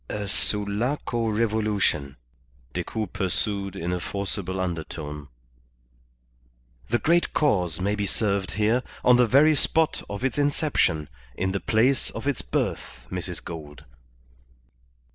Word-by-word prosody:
"A 105 -1 -3
Sulaco 115 +5 0
revolution," 105 - 0 0.6
Decoud 110 -4 -3
pursued 100 0 -1
in 90 -1 -2
a 90 - -1
forcible 95 0 -3
undertone. 75 -4 -4 1.6
"The 120 - +3
Great 170 +6 +2
Cause 90 - +2
may 100 +3 0
be 105 -1 -1
served 100 -2 0
here, 110 +4 +2 0.2
on 125 -1 +6
the 125 -1 +5
very 145 +7 +6
spot 160 +2 +2
of 100 +5 -3
its 135 +2 0
inception, 140 - +1 0.3
in 95 +6 -1
the 100 - -1
place 125 +4 +2
of 115 - -7
its 140 -3 0
birth, - - -3
Mrs. - - -4
Gould." 75 -4 -8
105 Hz, 125 wpm, -25 LUFS, 90-120 Hz, 1.6 s, on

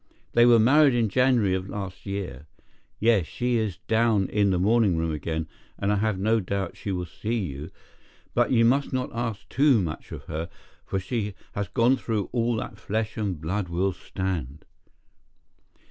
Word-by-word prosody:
They 120 0 +5
were 120 -1 +7
married 135 +4 +5
in 115 -3 +2
January 120 -4 +3
of 95 +1 -2
last 100 -1 -6
year. 95 -8 -5 0.5
Yes, 110 -7 +3
she 125 0 0
is 105 -5 -1
down 110 -3 +3
in 105 -1 +2
the 95 - +2
morning 100 -1 +3
room 80 0 0
again, 80 +2 -3 0.3
and 100 0 0
I - - +1
have 105 -1 0
no 110 +4 +2
doubt 95 -1 -3
she 100 - -5
will 90 -1 -2
see 110 +7 -4
you, 75 -7 -4 0.6
but 120 0 +2
you 115 -2 +5
must 135 +4 +2
not 130 -1 -2
ask 115 -3 -3
too 135 -2 +4
much 80 -5 -4
of - - -7
her, 80 +2 -5 0.4
for 95 - -1
she 105 +1 -3 0.2
has 100 -1 -3
gone 120 +7 +3
through 110 -5 -2
all 120 -1 +1
that 110 - -5
flesh 110 +1 -2
and 100 -7 -2
blood 90 +4 -2
will 90 +3 0
stand." 85 -7 -4
105 Hz, 175 wpm, -26 LUFS, 95-115 Hz, 0.6 s, were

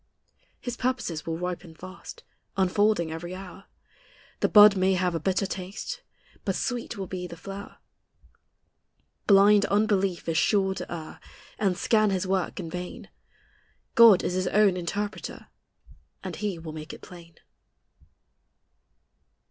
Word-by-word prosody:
His 245 -1 -5
purposes 245 -12 -2
will 165 0 -2
ripen 175 -1 -5
fast, 185 +3 -11 0.3
Unfolding 190 -2 +2
every 175 +3 -6
hour; 195 +1 -10 0.7
The - - +2
bud 210 -1 +8
may 190 0 +2
have 180 -1 0
a 165 - -1
bitter 190 +4 0
taste. 195 - -6 0.4
But - - -1
sweet 245 -4 -3
will 195 - -4
be 180 -1 -5
the 170 - -10
flower. 195 +3 -9 1.5
Blind 205 0 +6
unbelief 195 -4 +1
is 160 -1 +1
sure 195 -1 +2
to - - -7
err, 160 -2 -7 0.4
And 195 -4 +1
scan 215 -2 +3
His 190 -1 -1
work 190 +1 -1
in 175 - -5
vain: 180 +1 -7 0.8
God 230 -5 +7
is - - -1
His 185 0 0
own 205 -2 +4
interpreter, 200 +4 -5 0.7
And - - -5
He 205 -4 -2
will 160 -1 -8
make 155 0 -8
it - - -11
plain. 170 -2 -13
190 Hz, 135 wpm, -27 LUFS, 175-205 Hz, 1.5 s, bud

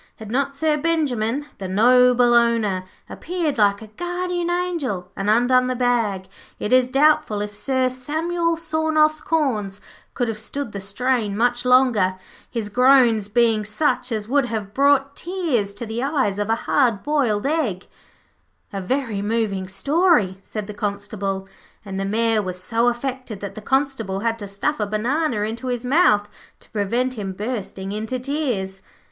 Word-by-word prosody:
Had 220 -1 -9
not 275 +2 0
Sir 305 +1 +1
Benjimen, 285 -5 0
the 190 - -4
noble 245 +4 +5
owner, 230 -6 +2 0.2
appeared 330 -7 -3
like 200 0 +3
a - - -10
guardian 350 - -3
angel 325 - -2
and 195 +1 -2
undone 250 +3 +4
the 255 - -1
bag, 230 -6 0 0.3
it 210 - -2
is 255 -1 +4
doubtful 275 -6 +3
if 205 0 -4
Sir 260 +3 +1
Samuel 325 +6 -1
Sawnoff's 315 -1 +1
corns 220 -11 -1 0.4
could 245 - 0
have 220 -1 -3
stood 275 +3 -5
the 200 - -5
strain 210 +1 -1
much 245 +1 +1
longer, 250 -7 +4 0.3
his 230 -4 -3
groans 245 -2 +4
bein' 225 0 +2
such 245 +4 0
as 215 -2 -2
would 275 0 +2
have 210 -4 -4
brought 280 +1 +3
tears 320 - -1
to 235 - -6
the 225 +2 -4
eyes 265 -8 0
of 205 +1 -2
a 225 - +3
hard 235 -8 +2
boiled 265 -8 +1
egg.' 275 - -1 0.9
'A 195 - -3
very 230 -1 -2
moving 205 -3 -1
story,' 215 - +2
said 210 +1 -6
the 210 - -7
Constable, 200 -1 -3 0.4
and 195 -1 -5
the 195 - -1
Mayor 225 +2 +1
was 185 -2 -5
so 225 +6 +1
affected 245 -3 -3
that 200 - -5
the 215 - -8
Constable 265 -6 -1
had 230 0 -1
to 205 - -6
stuff 205 +10 -2
a 210 - 0
banana 235 +4 0
into 225 +4 -3
his 245 -1 -2
mouth 230 -8 +4 0.3
to - - -18
prevent 235 +4 -1
him 195 -2 -4
bursting 200 -2 -5
into 220 +4 -3
tears. 245 -9 -3
235 Hz, 160 wpm, -22 LUFS, 205-275 Hz, 0.9 s, noble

